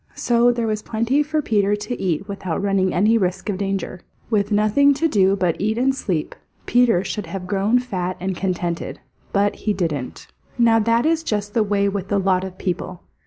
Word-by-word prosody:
So 240 0 +3
there 235 -1 -2
was 215 -1 -1
plenty 230 +7 0
for 305 +1 -1
Peter 205 -3 +2
to 210 +4 -5
eat 185 +1 -1
without 190 -4 -4
running 195 -2 +1
any 215 +5 +3
risk 185 +2 -2
of 195 -2 -2
danger. 195 -2 -3 0.3
With 205 -1 +1
nothing 215 +7 +4
to 325 +4 +1
do 195 -8 +3
but 180 -4 -1
eat 215 +2 0
and 265 +2 +2
sleep, 180 - -2 0.3
Peter 240 -7 +3
should 205 -3 -4
have 180 +2 -6
grown 200 +5 +1
fat 185 -7 -3
and 185 +1 -2
contented. 175 -2 -3 0.3
But 200 +1 +1
he 210 - -1
didn't. 160 -9 -3 0.3
Now 230 -2 +4
that 230 +3 +2
is 325 0 +2
just 210 -8 -3
the 230 - +2
way 200 -1 +1
with 195 -1 -3
a 205 - +3
lot 190 -1 +1
of 190 -1 -7
people. 180 -1 -4
205 Hz, 195 wpm, -21 LUFS, 185-230 Hz, 0.3 s, nothing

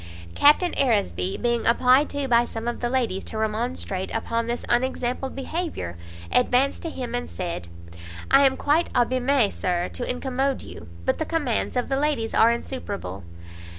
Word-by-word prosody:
Captain 300 +5 +5
Aresby, 195 - +1
being 235 -1 0
applied 255 +4 +4
to 285 -1 -2
by 235 -1 +4
some 230 -1 -6
of 240 - -2
the 240 - -1
ladies 240 -7 0
to 220 - -6
remonstrate 220 -3 -2
upon 230 +1 -1
this 240 +1 -3
unexampled 255 +1 0
behaviour, 275 - -4 0.4
advanced 250 +2 +2
to 330 - -4
him, 250 -6 -6
and 245 0 -3
said, 170 - -5 0.6
"I 275 +1 +7
am 265 - -1
quite 310 +4 +1
abimé, 250 -1 +2
Sir, 175 -1 -1
to 250 - -5
incommode 265 +1 -1
you, - - -10 0.2
but - - +1
the 315 - -1
commands 295 -10 -1
of 250 - 0
the 270 - 0
ladies 280 -6 0
are 225 - +6
insuperable. 200 - -5
245 Hz, 160 wpm, -24 LUFS, 225-270 Hz, 0.6 s, I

